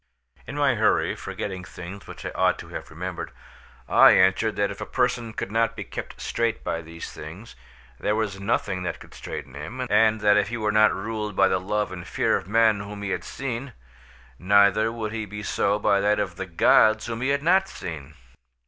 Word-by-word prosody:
In 135 - -6
my 145 -3 +3
hurry, 110 -2 +2
forgetting 95 -2 -5
things 95 +2 -9
which - - -10
I - - -3
ought - - +2
to - - -10
have - - -7
remembered, - - -5 0.6
I - - +7
answered 95 +4 +3
that 100 0 0
if 100 - -9
a - - -3
person 125 -2 0
could 105 - -5
not 115 +1 +1
be 105 - -5
kept - - -8
straight 115 -1 -1
by 85 - -2
these 85 +1 -9
things, 85 +9 -10 0.4
there 105 - 0
was 105 -3 -2
nothing 100 -2 -1
that 90 - -4
could - - -14
straighten 65 - -7
him, 95 - -5
and 110 -1 +4
that 105 0 +5
if 105 - +2
he 120 +2 -4
were 105 -1 0
not 110 0 +5
ruled 105 0 -4
by 95 0 +5
the 95 - +1
love 105 +3 -1
and 90 -2 -8
fear - - +1
of - - -3
men 110 0 +3
whom 100 0 -7
he 100 - -2
had - - -2
seen, 130 -1 -5 0.7
neither 100 +3 +4
would 110 -2 -4
he 110 -1 -3
be 105 +1 -7
so 100 +1 +1
by 100 -1 +2
that 105 +1 +2
of 95 -3 -2
the 95 +2 -5
gods 110 +5 +4
whom 115 0 -4
he 130 - 0
had 140 +1 +1
not 190 +3 +3
seen. 75 -5 -8
105 Hz, 210 wpm, -25 LUFS, 95-115 Hz, 0.7 s, I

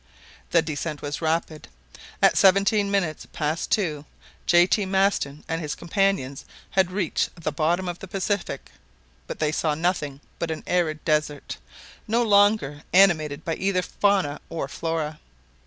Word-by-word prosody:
The 165 - +3
descent 155 -1 -4
was 145 +2 -4
rapid. 160 -1 -1 0.6
At - - +6
seventeen 200 +2 +4
minutes 185 -6 -1
past 155 +2 -2
two, 155 -9 0 0.4
J. 175 0 +6
T. 205 +3 +1
Maston 190 -7 0
and 165 0 -2
his 150 -2 -3
companions 170 -7 0 0.3
had 190 -2 +2
reached 180 -2 -2
the 155 -2 -2
bottom 170 +5 0
of 175 0 -4
the 190 - -8
Pacific; 190 -6 -3 0.6
but - - -5
they 155 -1 0
saw 155 -1 0
nothing 155 -4 -1 0.2
but 170 - -2
an 160 - -4
arid 160 -4 0
desert, 150 -2 -1 0.5
no 230 +3 +2
longer 205 -9 +3
animated 160 -6 +3
by 165 - -1
either 190 -1 0
fauna 190 -9 +1
or 160 -4 -3
flora. 155 0 -3
165 Hz, 145 wpm, -24 LUFS, 150-195 Hz, 0.6 s, At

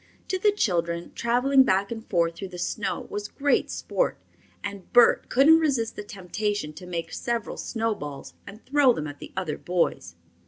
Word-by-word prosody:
To 375 - 0
the 415 +2 +4
children, 170 - -1
traveling 250 +4 +3
back 200 -5 +2
and 225 -1 -5
forth 170 -3 +2
through 195 - -6
the 180 -1 -9
snow 210 +4 -2
was 205 0 -3
great 285 +5 +1
sport, - - -1 0.5
and 200 -2 -7
Bert 240 -1 +5
couldn't 305 +5 +6
resist 260 -8 0
the - - -6
temptation 205 -3 -3
to 180 +3 -11
make 170 -2 -4
several 235 -2 -2
snowballs 210 - -4
and 210 +3 -12
throw 275 -2 +4
them 155 - -4
at 145 -1 -8
the - - -10
other 180 -5 -2
boys. 170 - -1
205 Hz, 170 wpm, -26 LUFS, 175-245 Hz, 0.5 s, couldn't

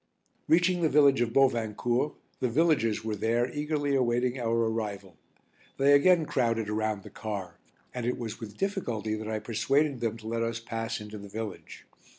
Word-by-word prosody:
Reaching 175 +2 +3
the 160 - +3
village 140 -3 +5
of 120 -1 +1
Bovincourt, 120 +1 +1 0.2
the 125 - 0
villagers 115 -7 +2
were 110 -1 -1
there 120 +4 0
eagerly 145 -1 -1
awaiting 125 0 +1
our 115 -1 0
arrival. 105 -5 -4 0.6
They 140 +1 +5
again 165 +3 +5
crowded 115 -6 0
around 105 -1 -1
the - - -11
car, 100 -6 -6 0.3
and 125 - -4
it 125 +2 -1
was 115 -2 -5
with 110 -3 -9
difficulty 120 - -2
that 110 0 -4
I 110 - -1
persuaded 135 +6 0
them 115 -1 -2
to 110 -1 -10
let 115 +1 -1
us 115 0 -1
pass 115 0 -4
into 105 0 -8
the 100 0 -10
village. 110 -1 -7
115 Hz, 170 wpm, -28 LUFS, 110-135 Hz, 0.6 s, village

